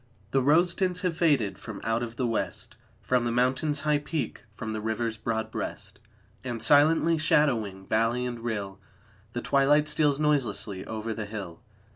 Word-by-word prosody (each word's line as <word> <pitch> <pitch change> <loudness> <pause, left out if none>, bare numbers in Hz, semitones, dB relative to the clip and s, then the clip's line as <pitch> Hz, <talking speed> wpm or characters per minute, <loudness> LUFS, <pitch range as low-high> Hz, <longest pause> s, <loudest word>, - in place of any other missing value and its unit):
The 135 - +3
rose 165 +6 +4
tints 180 -1 -1
have 180 -3 -1
faded 145 - +1
from - - -8
out 115 +1 0
of 120 -1 -5
the 125 - -1
West, 110 0 -3 0.3
From 125 -1 +1
the 120 - -1
Mountain's 130 +5 +1
high 150 -1 +2
peak, 150 -4 -4
from 110 -1 -5
the 110 - -4
river's 110 +1 -2
broad 110 0 -3
breast. - - -6 0.4
And, 120 -3 -4
silently 155 +6 +4
shadowing 115 -11 +1
valley 115 +4 +1
and 120 -1 -4
rill, 100 -4 -4 0.5
The 120 - -4
twilight 145 +2 +3
steals 150 -2 +2
noiselessly 120 -10 0
over 110 0 -4
the 105 -2 -5
hill. 100 -6 -7
120 Hz, 165 wpm, -27 LUFS, 110-150 Hz, 0.5 s, rose